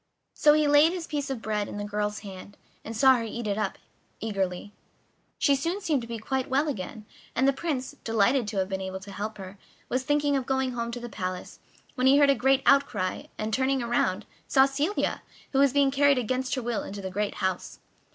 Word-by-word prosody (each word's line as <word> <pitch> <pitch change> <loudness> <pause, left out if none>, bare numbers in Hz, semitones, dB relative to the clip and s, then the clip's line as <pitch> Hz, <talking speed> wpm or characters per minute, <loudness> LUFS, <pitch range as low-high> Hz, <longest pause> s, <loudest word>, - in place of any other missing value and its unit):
So 295 -1 +5
he 305 0 +3
laid 295 +3 +6
his 355 -3 -4
piece 290 -3 -3
of 260 -4 -4
bread 210 -2 -1
in - - -7
the 205 - -3
girl's 210 0 -2
hand, 200 0 -10 0.3
and 225 0 -6
saw 265 0 +6
her 230 - -3
eat 230 +1 -5
it 205 -1 0
up - - -2 0.4
eagerly. 195 -2 -3 0.6
She 280 -3 +3
soon 335 +8 -2
seemed 310 -9 0
to 230 - -8
be 230 0 -4
quite 260 +5 -2
well 275 +4 +2
again, 215 -4 -5 0.3
and 260 +3 +3
the 275 - +4
Prince, 270 -3 -3
delighted 225 +2 +2
to 210 -1 -4
have 190 -1 +1
been 190 -1 -3
able 190 0 -4
to 200 +1 -11
help 210 +2 -5
her, 190 0 -9 0.3
was 255 - 0
thinking 290 +1 +1
of 265 -2 -1
going 265 -1 0
home 235 -1 -3
to 245 - -4
the 240 - -6
palace, 185 -4 -5 0.3
when 255 -1 +1
he 275 +1 +6
heard 285 -1 +6
a - - +5
great 270 0 +2
outcry, 275 -10 +2
and, 215 +1 -3
turning 265 +1 +1
round, 220 -4 0 0.2
saw 265 -1 +5
Celia, 290 +8 -1 0.3
who 270 - +1
was 280 -1 +5
being 280 0 +3
carried 280 0 +4
against 255 +3 -1
her 255 - -3
will 235 -1 -1
into 200 0 -7
the 190 - -4
great 205 +2 -2
house. 190 -2 -2
245 Hz, 220 wpm, -27 LUFS, 205-275 Hz, 0.6 s, laid